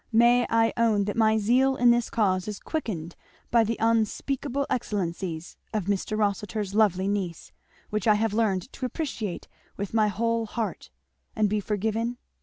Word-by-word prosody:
May 240 +2 +5
I 225 0 +3
own 225 -3 +3
that 205 - -3
my 220 -1 +4
zeal 255 +5 +3
in 245 -1 +5
this 240 -1 +1
cause 190 -4 +1
is 210 -1 -5
quickened 180 - -4 0.4
by 235 -1 +5
the 225 +1 -1
unspeakable 245 +5 0
excellencies 180 -7 -3 0.2
of 210 -4 0
Mr. 200 +2 -1
Rossitur's 205 -1 -1
lovely 195 -3 +3
niece 190 -5 -3 0.4
which 215 0 -1
I 215 - +6
have 220 0 0
learned 210 -1 0
to 255 - -3
appreciate 235 - -4 0.3
with 200 0 -4
my 215 -1 +4
whole 230 +2 0
heart 225 +1 -4 0.5
and 215 -1 +3
be 210 +1 0
forgiven? 220 +3 -1
215 Hz, 160 wpm, -26 LUFS, 200-230 Hz, 0.5 s, I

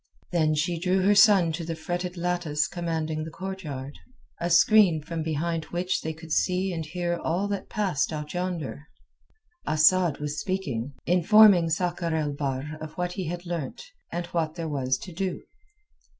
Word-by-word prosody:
Then 155 -3 +2
she 165 +3 0
drew 185 +2 +1
her 205 +2 +5
son 195 -4 +6
to 165 +2 -4
the 165 0 -4
fretted 175 +2 -4
lattice 170 -4 0
commanding 160 -3 -3
the 160 - -6
courtyard, 155 -7 -6 0.4
a 170 - -1
screen 175 0 +5
from 165 +1 -4
behind 160 +1 -2
which 180 +2 -2
they 160 - -3
could 160 +1 -11
see 185 +3 +1
and 165 -2 -3
hear 175 +2 -2
all 180 +5 -1
that 200 -1 -4
passed 195 -11 0
out 150 -1 -5
yonder. 175 -5 -4 0.8
Asad 155 +1 +4
was 150 0 -3
speaking, 145 -9 -3
informing 180 0 +6
Sakr 170 0 -1
el 150 -2 -1
Bahr 140 +2 -3
of 155 - -7
what 180 0 -2
he 180 -2 -4
had 175 +2 -5
learnt, 170 -5 -4 0.3
and 175 0 -3
what 160 -3 -2
there 165 -1 -4
was 130 -4 0
to 180 - -10
do. 190 +1 -3
170 Hz, 165 wpm, -26 LUFS, 155-180 Hz, 0.8 s, son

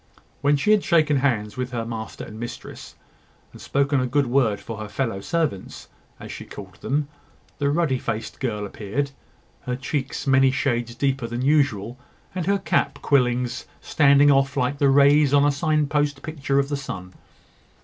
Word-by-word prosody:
When 145 +1 +3
she 210 +9 +2
had 210 -2 +4
shaken 155 -4 +3
hands 115 -6 0
with 125 0 -2
her 115 -1 -2
master 115 -1 -6
and 110 0 -10
mistress, 120 +1 -8 0.6
and - - -13
spoken 140 0 +1
a 130 - 0
good 140 +3 +1
word 120 -5 +1
for 115 - -7
her 110 - -5
fellow 105 -2 -2
servants, 160 - -3 0.3
as - - -9
she - - -7
called 95 -1 -11
them, 145 +1 -1 0.5
the 140 -1 +1
ruddy 145 -4 +1
faced 110 -1 -4
girl 105 -6 -2
appeared, 110 +8 -3 0.6
her 125 - -1
cheeks 135 +1 -3
many 135 -1 +5
shades 120 -4 -1
deeper 135 -1 -1
than 120 +2 -4
usual, 130 -6 +1 0.3
and 180 -2 -3
her 200 0 +3
cap 185 - 0
quillings 125 -3 +1
standing 145 -1 +4
off 135 0 +2
like 140 +3 0
the 140 - +4
rays 140 +1 +5
on 145 0 +5
a 145 - +4
sign 155 +1 +1
post 145 -1 -1
picture 140 -3 -2
of 140 0 +1
the 145 - -1
sun. 90 -9 -7
135 Hz, 175 wpm, -23 LUFS, 120-145 Hz, 0.6 s, many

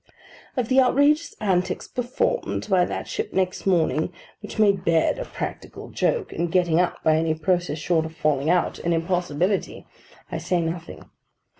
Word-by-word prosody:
Of 245 -3 0
the 260 +2 +4
outrageous 285 +5 +3
antics 185 -3 0
performed 255 - -2
by 185 -3 +3
that - - -5
ship - - -4
next 185 0 -1
morning; 165 -2 +2 0.3
which 210 - -8
made 200 -4 +3
bed 165 - +2
a - - -4
practical - - -7
joke, 470 -5 0
and 170 0 -2
getting 175 -2 +3
up, 180 - -1
by 155 0 +4
any 160 0 +1
process 175 -1 0
short 160 0 0
of 160 - -13
falling 150 -2 +1
out, 180 +1 +1
an 170 - 0
impossibility; 175 +2 -1 0.5
I - - -2
say 180 - 0
nothing. 165 0 -5
180 Hz, 160 wpm, -24 LUFS, 165-210 Hz, 0.5 s, the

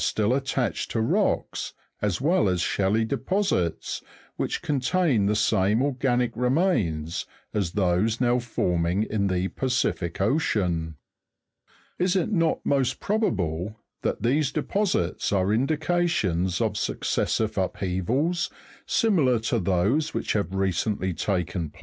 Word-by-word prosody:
still 110 +2 +1
attached 135 -2 -1
to 115 - -1
rocks, 110 - 0 0.3
as 105 -4 0
well 160 - +3
as 90 -1 0
shelly 100 +4 +1
deposits, 180 - -1 0.3
which - - -2
contain 140 - +1
the 105 - +2
same 105 0 +2
organic 125 -3 0
remains 115 - 0 0.3
as 95 -5 -1
those 100 +3 +1
now 125 0 +3
forming 90 -5 0
in 105 -2 -1
the 90 0 0
Pacific 125 -9 -1
Ocean. 95 - 0 1.0
Is 180 +1 +2
it 190 +3 +1
not 165 -5 +1
most 135 -3 +1
probable 100 - -1 0.3
that - - -2
these 140 +4 +2
deposits 170 - 0
are 100 0 +2
indications 135 - +1
of - - 0
suc - - -2
cessive 110 -3 0
upheavals, 115 - -1 0.4
similar 160 - +3
to 115 +1 0
those 100 - +1
which - - -1
have 100 -3 -1
recently 95 0 0
taken 90 -3 -2
place? - - -20
110 Hz, 125 wpm, -25 LUFS, 95-140 Hz, 1.0 s, well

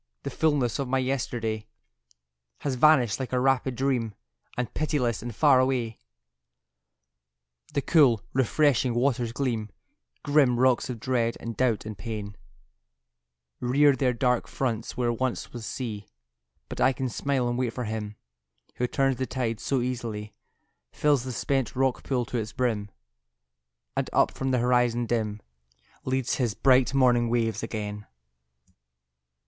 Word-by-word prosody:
The - - -4
fulness 145 -6 +1
of 135 - -1
my 135 +1 +1
yesterday 120 -4 -2 0.9
Has 140 - -1
vanished 130 -4 +4
like 130 - -4
a 125 - +1
rapid 130 0 +1
dream, 120 -4 -1 0.4
And 125 -2 -2
pitiless 135 -8 0
and 120 -1 -6
far 140 -4 +5
away 125 -4 0 1.8
The 140 - +1
cool, 130 - +4
refreshing 130 -1 +2
waters 120 -2 +1
gleam: 115 -4 -2 0.5
Grim 140 -5 +3
rocks 130 -1 +3
of 120 -3 -4
dread 115 -1 0
and 115 -1 -6
doubt 115 -1 +1
and 110 -1 -5
pain 105 -1 -6 1.2
Rear 140 +3 +4
their 130 -2 +1
dark 125 0 +1
fronts 115 -4 -3
where 120 -1 +1
once 130 +1 -3
was 120 -2 -6
sea; 110 -6 -5 0.6
But - - -6
I 135 - +4
can 130 +1 -2
smile 130 +1 -1
and 120 - -1
wait 125 -1 0
for 125 - -4
Him 105 -1 -4 0.6
Who 125 - 0
turns 135 0 +1
the 130 - -2
tides 115 -4 -2
so 135 -3 0
easily, 115 -4 -4 0.6
Fills 145 -4 +2
the 130 - -4
spent 135 +2 -1
rock 130 0 +1
pool 125 -3 -1
to 120 - -3
its 110 0 -5
brim, 115 -6 -1 1.1
And - - -1
up - - +3
from 135 - -3
the 130 - +2
horizon 120 -1 +2
dim 110 -3 -2 0.6
Leads 130 -1 0
His 120 -5 0
bright 130 -1 +4
morning 120 -3 +4
waves 115 -2 0
again. 105 -1 -5
125 Hz, 145 wpm, -27 LUFS, 115-130 Hz, 1.8 s, far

